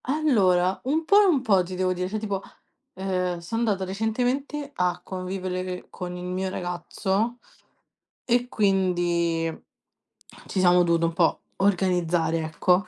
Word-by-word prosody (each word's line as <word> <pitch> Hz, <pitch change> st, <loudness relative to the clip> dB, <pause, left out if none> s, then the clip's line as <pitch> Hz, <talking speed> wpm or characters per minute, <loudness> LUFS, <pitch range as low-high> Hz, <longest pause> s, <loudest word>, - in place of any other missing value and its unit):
Allora, 200 Hz, -11 st, +2 dB
un 315 Hz, +5 st, 0 dB
po' 410 Hz, +4 st, +6 dB
e -, -, +5 dB
un 325 Hz, -9 st, +3 dB
po' 200 Hz, -6 st, +4 dB
ti 180 Hz, +1 st, -5 dB
devo 185 Hz, 0 st, +1 dB
dire, 180 Hz, 0 st, -3 dB
cioè 215 Hz, -, -2 dB
tipo, 200 Hz, -3 st, -3 dB, 0.6 s
uhm, 180 Hz, -2 st, -1 dB
sono 170 Hz, +6 st, -8 dB
andato 220 Hz, -4 st, +1 dB
recentemente 250 Hz, +8 st, -2 dB
a 180 Hz, -1 st, 0 dB
convivere 185 Hz, -1 st, -4 dB
con 180 Hz, -1 st, -6 dB
il 180 Hz, -, -7 dB
mio 185 Hz, +1 st, -2 dB
ragazzo, 190 Hz, +6 st, -2 dB, 0.9 s
e 245 Hz, 0 st, +1 dB
quindi 175 Hz, -5 st, +1 dB, 1.0 s
ci 195 Hz, -, -2 dB
siamo 180 Hz, -1 st, +5 dB
dovuti 170 Hz, -1 st, +2 dB
un 165 Hz, -, +2 dB
po' 170 Hz, -1 st, +2 dB, 0.2 s
organizzare, 175 Hz, -4 st, +1 dB
ecco. 180 Hz, +5 st, +2 dB
185 Hz, 140 wpm, -25 LUFS, 180-220 Hz, 1.0 s, po